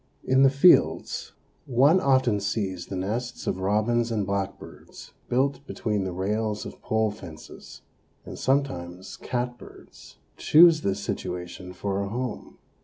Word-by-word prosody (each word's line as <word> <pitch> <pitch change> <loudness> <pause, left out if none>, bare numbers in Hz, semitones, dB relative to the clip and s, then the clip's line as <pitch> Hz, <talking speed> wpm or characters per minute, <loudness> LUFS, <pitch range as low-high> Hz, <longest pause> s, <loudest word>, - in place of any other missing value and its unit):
In 130 +1 +3
the 135 - +7
fields 140 +7 +3 0.3
one 140 +8 +4
often 130 - +2
sees 100 -3 -3
the 95 - -5
nests 115 +6 -4
of 95 - -2
robins 110 +5 +1
and 105 -3 -1
blackbirds 100 0 -6 0.2
built 135 +2 0
between 105 -3 -2
the 95 - -3
rails 105 +4 -2
of - - -10
pole 110 -1 0
fences, 90 -7 -12 0.4
and - - -9
sometimes 95 -10 -2
catbirds 125 0 -7 0.2
choose 165 0 +6
this 100 -6 -1
situation 90 +1 -5
for 100 +2 -3
a 100 - -3
home. 125 +2 -5
110 Hz, 130 wpm, -25 LUFS, 95-130 Hz, 0.4 s, the